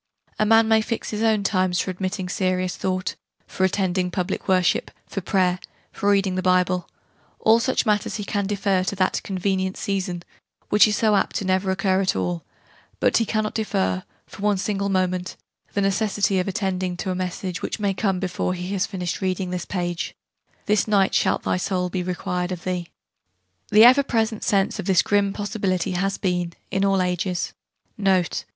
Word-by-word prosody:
A 215 - +3
man 225 0 +5
may 220 0 +4
fix 230 +1 -3
his 210 0 -3
own 220 -2 +2
times 185 -3 +1
for 185 - -1
admitting 185 +1 -3
serious 185 -1 -1
thought, 185 -1 -2 0.3
for 190 - -3
attending 185 -1 0
public 180 +1 -3
worship, 185 -2 +2 0.2
for 195 - -5
prayer, 185 -1 +1 0.3
for 200 - -1
reading 195 -2 +3
the 185 - -1
Bible: 180 -1 +2 0.5
all 225 +1 +5
such 255 +2 0
matters 210 -1 +1
he 210 - -3
can 200 0 -1
defer 200 -2 +1
to 200 - -2
that 185 -1 +1
'convenient 190 0 -1
season', 185 -3 -2 0.5
which 210 +1 +6
is 210 - +1
so 215 -2 +3
apt 195 0 0
never 190 +1 +1
to - - +2
occur 190 0 +1
at 190 - +1
all: 90 -2 -2 0.6
but - - +3
he 230 - +1
cannot 215 -1 -1
defer, 95 - 0 0.2
for - - -12
one 205 -1 +2
single 200 +1 -1
moment, 185 -1 -1 0.4
the 200 - +1
necessity 200 0 +1
of 180 - -1
attending 185 -2 -2
to 185 - -3
a - - -2
message, 185 0 -4
which - - -3
may 200 -2 +1
come 190 -1 0
before 185 -1 -2
he 180 +2 -4
has 200 0 0
finished 180 -2 -4
reading 185 -1 -1
this 180 -2 -3
page,' 175 -2 -3 0.5
this 210 -1 +2
night 200 -2 +3
shalt - - +2
thy - - 0
soul 180 -1 -1
be 185 - -1
required 180 0 -2
of 175 -2 -5
thee.' 180 -2 -2 0.8
The 215 +1 +7
ever 255 +4 +8
present 225 -4 -1
sense 195 -2 +1
of - - -4
this 190 -2 +4
grim 205 -1 +2
possibility 200 -3 -1
has 195 +2 -1
been, 180 -3 -1 0.2
in 195 0 +1
all 195 -1 +3
ages,* 180 0 -2 0.5
Note... 190 -4 +1
190 Hz, 185 wpm, -23 LUFS, 180-205 Hz, 0.8 s, ever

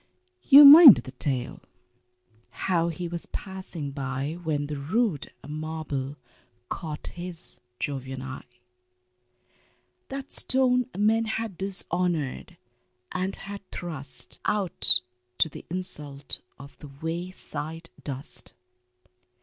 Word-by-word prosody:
You 290 -2 +9
mind 290 - +12
the 130 - -7
tale 130 -1 +1 1.0
how 170 -3 +1
he 170 +1 -4
was 170 0 -5
passing 185 -7 -7
by 135 +1 -4
When 150 -3 -1
the 150 0 -5
rude 180 - -1 0.2
marble 150 -3 -5 0.5
caught 155 -3 -5
his 175 -1 -3 0.2
Jovian 130 -2 -4
eye, 125 -2 -10 1.5
That 275 0 -7
stone 255 -1 +2
men 220 +2 +2
had 220 -2 -3
dishonored 175 -5 -2 0.5
and 185 +1 -2
had 200 0 -7
thrust 155 -7 -6
Out 195 -11 +3 0.4
to 160 - +3
the - - -11
insult 150 -6 -2 0.2
of 140 +2 -13
the 150 - -11
wayside 165 -1 -5
dust. 140 -1 +1
165 Hz, 100 wpm, -26 LUFS, 140-190 Hz, 1.5 s, mind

